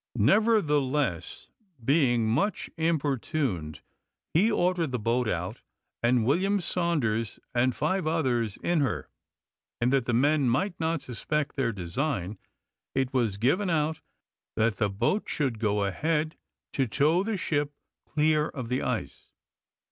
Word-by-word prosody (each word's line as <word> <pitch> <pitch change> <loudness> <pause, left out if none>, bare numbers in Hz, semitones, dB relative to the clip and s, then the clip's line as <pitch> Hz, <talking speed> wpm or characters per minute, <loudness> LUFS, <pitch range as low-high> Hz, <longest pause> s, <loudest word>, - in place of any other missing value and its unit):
Nevertheless, 145 - +2 0.4
being 125 -6 +3
much 155 - 0
importuned, 140 - -1 0.5
he 200 +8 +4
ordered 175 -6 +1
the 125 - 0
boat 115 +2 0
out, - - -3 0.4
and 120 -1 +3
William 190 - +2
Saunders 145 - -1
and 125 +1 +2
five 190 -4 0
others 125 - 0
in 175 -1 +2
her; 140 -3 -1 0.7
and, 120 +3 +2
that 135 -3 +2
the 120 - +1
men 140 +2 +3
might 175 - +1
not 165 -2 0
suspect 140 +4 -2
their 125 -4 +1
design, 100 - -3 0.6
it 135 -1 0
was 115 -6 +1
given 180 - +2
out 160 -1 0 0.5
that 110 -2 +1
the 105 - +1
boat 105 - 0
should 130 -7 -1
go 105 -2 +1
ahead 155 - 0 0.4
to 135 -2 +1
tow 150 +9 +2
the 215 0 -2
ship 145 -4 -1 0.4
clear 155 0 +2
of 130 -5 -6
the 125 - 0
ice. - - -4
140 Hz, 135 wpm, -28 LUFS, 115-160 Hz, 0.7 s, he